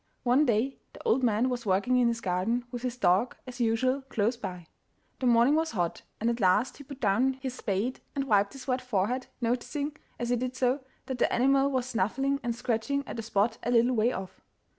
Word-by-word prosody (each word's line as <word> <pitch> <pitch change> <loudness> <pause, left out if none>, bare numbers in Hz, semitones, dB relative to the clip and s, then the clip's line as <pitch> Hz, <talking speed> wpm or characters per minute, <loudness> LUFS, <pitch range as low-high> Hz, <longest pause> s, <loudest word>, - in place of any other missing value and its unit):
One 260 +4 +4
day 240 +4 +1
the - - -12
old 450 - +2
man 235 0 +2
was 250 -2 -2
working 205 +5 +2
in 245 -1 +4
his 230 0 -1
garden, 195 +7 0
with 245 -2 -5
his 250 -1 -3
dog, 195 +3 +2
as 255 -1 -9
usual, 255 +4 +2
close 225 +2 +1
by. 185 -6 -6 0.5
The 255 - +1
morning 240 +3 +5
was 320 -3 +1
hot, 175 -5 -1 0.2
and 230 - 0
at 235 0 0
last 205 +5 +2
he 285 - -10
put 275 -1 -10
down 245 +4 +2
his 265 -1 -5
spade 215 +2 -2 0.2
and 275 - 0
wiped 205 -5 +2
his 270 -1 -9
wet 255 -1 0
forehead, 250 +1 -1
noticing, 280 +5 -1 0.2
as 240 - -3
he 245 - +2
did 255 +1 -3
so, 260 +1 +1 0.3
that 260 -2 -4
the - - +2
animal 275 +2 +3
was 260 -3 0
snuffling 260 +4 0
and 240 -3 -2
scratching 255 +4 -1
at - - -5
a - - -1
spot 220 0 0
a - - -3
little 240 +1 +4
way 225 +2 +3
off. 190 -4 -7
245 Hz, 215 wpm, -29 LUFS, 225-260 Hz, 0.5 s, morning